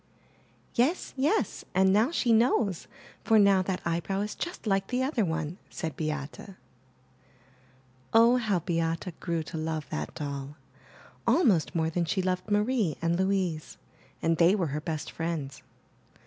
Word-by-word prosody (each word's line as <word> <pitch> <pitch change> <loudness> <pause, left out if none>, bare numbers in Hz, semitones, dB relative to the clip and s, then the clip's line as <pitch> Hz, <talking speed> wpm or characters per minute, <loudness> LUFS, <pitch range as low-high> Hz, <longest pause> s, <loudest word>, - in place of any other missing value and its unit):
''Yes, 270 +9 +1
yes, 295 +11 0
and 190 0 +4
now 220 +6 +4
she 250 -8 +2
knows, 220 -5 +2 0.4
for 225 - +4
now 200 -2 +5
that 185 0 -2
eyebrow 170 +4 -1
is 210 +1 -3
just 350 -6 -6
like 195 -2 +1
the 255 +1 0
other 260 -4 +1
one,'* 160 0 -3
said 160 -4 -5
Beate. 150 -2 -4 1.7
Oh, 230 +2 +6
how 215 -6 +1
Beate 165 +1 -1
grew 170 -2 -2
to 160 +1 -6
love 155 -1 -3
that 75 0 -4
doll, 140 -2 -5 0.7
almost 205 - +3
more 160 -1 +1
than 170 +1 0
she 190 +3 -1
loved 185 +2 -1
Marie 210 - +1
and 165 +1 +1
Louise, 185 -4 -1 0.5
and 165 0 +2
they 175 +4 +5
were 175 -8 -1
her 150 - -2
best 155 -1 -4
friends. 160 -5 -4
180 Hz, 150 wpm, -28 LUFS, 160-215 Hz, 1.7 s, Oh